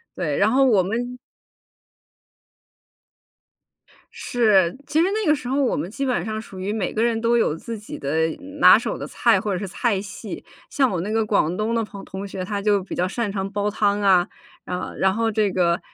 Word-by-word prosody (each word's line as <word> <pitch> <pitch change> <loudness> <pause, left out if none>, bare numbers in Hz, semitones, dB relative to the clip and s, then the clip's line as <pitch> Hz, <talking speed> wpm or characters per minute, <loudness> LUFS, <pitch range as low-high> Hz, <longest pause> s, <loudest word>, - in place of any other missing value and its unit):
对， 150 -5 -2
然 205 +2 +4
后 270 +2 +4
我 220 -7 +4
们 240 +6 -3 3.0
是， 210 -6 +2
其 300 +2 +1
实 345 - +3
那 430 0 -1
个 - - +6
时 250 - -8
候 275 +2 +1
我 255 - +1
们 160 +5 -3
基 275 +6 -3
本 255 -2 0
上 215 0 -3
属 190 -3 -11
于 200 +3 -2
每 215 -4 -2
个 220 - -1
人 230 -1 +1
都 235 +1 +3
有 155 - +1
自 230 +7 -7
己 210 - -8
的 160 +4 0 0.3
拿 - - +8
手 - - -3
的 - - -6
菜 - - +2
或 210 -3 -2
者 - - -1
是 200 - -4
菜 200 +1 -1
系。 200 - -8 0.3
像 265 -2 +2
我 180 - -1
那 195 +5 -3
个 225 0 +1
广 190 -5 +1
东 215 +4 -1
的 230 - +1
朋 200 -2 -9
同 195 +1 -7
学， 190 -1 -5
他 200 +1 -3
就 205 -2 +2
比 195 - -8
较 180 - 0
擅 215 +2 -2
长 195 -1 -3
煲 205 +1 -1
汤 205 -1 +1
啊， 185 -3 +4 0.4
啊。 180 0 -4
然 190 0 +2
后 225 +2 0
这 215 -2 +1
个， 175 -2 +1
205 Hz, 225 characters per minute, -22 LUFS, 190-230 Hz, 3.0 s, 拿